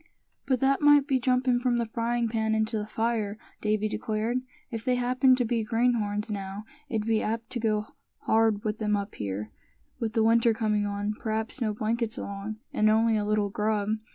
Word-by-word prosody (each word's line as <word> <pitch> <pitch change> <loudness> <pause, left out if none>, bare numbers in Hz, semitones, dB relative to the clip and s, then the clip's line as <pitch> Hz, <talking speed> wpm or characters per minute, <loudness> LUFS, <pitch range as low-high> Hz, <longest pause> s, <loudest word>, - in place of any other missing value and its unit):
"But 260 -3 +1
that 270 +1 +3
might 290 -1 +6
be 270 -2 +1
jumpin' 250 0 +2
from 245 -1 +1
the 235 - 0
frying 235 +1 -1
pan 220 -1 0
into 220 +1 0
the 210 - -4
fire," 220 -2 -1 0.2
Davy 215 0 +1
declared. 220 +3 -1 0.3
"If 225 -2 -4
they 250 +1 +2
happened 250 +1 +3
to 245 - +1
be 230 0 0
greenhorns, 225 -2 0
now, 195 0 -5 0.3
it'd 215 -3 -1
be 225 -1 +2
apt 225 +1 -3
to 245 - -2
go 215 -2 0 0.4
hard 220 -1 +2
with 215 -1 -3
'em 210 -1 +2
up 200 0 -3
here, 105 +1 -4 0.5
with 225 -2 -2
the 225 -2 +3
winter 230 0 +4
comin' 210 -2 0
on, 205 +1 -2
p'raps 220 +3 -3
no 220 -2 +1
blankets 225 +1 -1
along, 200 +2 -5 0.2
and 215 0 +3
only 225 +1 +3
a 210 - +1
little 210 -1 0
grub. 210 0 0
220 Hz, 190 wpm, -27 LUFS, 210-235 Hz, 0.5 s, might